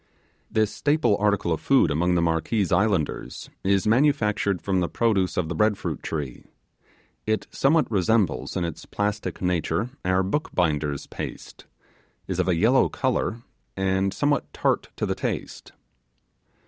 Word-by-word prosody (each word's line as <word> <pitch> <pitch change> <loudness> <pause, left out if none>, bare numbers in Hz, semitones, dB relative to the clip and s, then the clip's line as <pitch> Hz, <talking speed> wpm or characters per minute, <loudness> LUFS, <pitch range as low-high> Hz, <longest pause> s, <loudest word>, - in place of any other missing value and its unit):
This 110 -1 +1
staple 145 -7 +2
article 100 -4 +1
of 80 - -4
food 135 - +3
among 90 +4 +1
the 85 - +2
Marquese 85 +5 0
islanders 100 -7 0
is 95 -1 +2
manufactured 110 -6 +2
from 95 0 0
the 85 - 0
produce 105 -6 +1
of 90 - 0
the 85 - -3
bread 105 +4 +2
fruit 80 -7 -4
tree. 75 -6 -5 0.8
It 110 0 0
somewhat 155 +3 +3
resembles 95 - +1
in 90 - 0
its 85 - -7
plastic 105 -2 -3
nature 90 +5 0
our 95 +1 +2
bookbinders' 80 - -1
paste, - - -8 0.6
is - - -3
of - - +1
a 90 - +3
yellow 115 +10 +4
colour, 120 -3 -1 0.3
and 95 0 +1
somewhat 145 +8 0
tart - - 0
to - - -2
the - - 0
taste. - - -5
95 Hz, 145 wpm, -25 LUFS, 85-110 Hz, 0.8 s, yellow